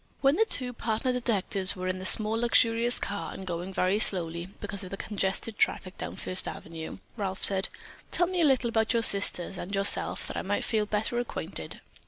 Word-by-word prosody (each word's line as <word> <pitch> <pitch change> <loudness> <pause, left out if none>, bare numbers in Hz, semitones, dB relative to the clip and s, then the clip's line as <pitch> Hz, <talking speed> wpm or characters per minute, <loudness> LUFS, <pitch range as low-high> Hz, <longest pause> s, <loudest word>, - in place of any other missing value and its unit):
When 275 +1 +4
the 445 - +3
two 250 - +4
partner 230 +2 -1
detectives 200 -6 +1
were 185 -1 -4
in 185 0 -2
the 185 - 0
small, 215 -1 +3
luxurious 235 0 +3
car, 205 - -4
and 190 - -8
going 175 +1 -4
very 190 +2 +1
slowly, 170 -4 +1
because 205 -1 -5
of 185 - -7
the 195 - -6
congested 205 +1 -2
traffic 185 -1 0
down - - -5
First 185 - -1
Avenue, 165 -1 -7 0.2
Ralph 190 -3 -3
said: 195 -1 +3 0.4
"Tell 350 - +2
me 360 0 -1
a - - +5
little 260 -4 +3
about 220 +1 +1
your 230 -1 +2
sisters 195 -3 +3
and 195 +3 -4
yourself 195 0 +1
that - - -5
I - - -1
may 205 +2 -1
feel 215 -2 0
better 215 +3 -1
acquainted." 240 - -4
205 Hz, 200 wpm, -28 LUFS, 185-235 Hz, 0.4 s, a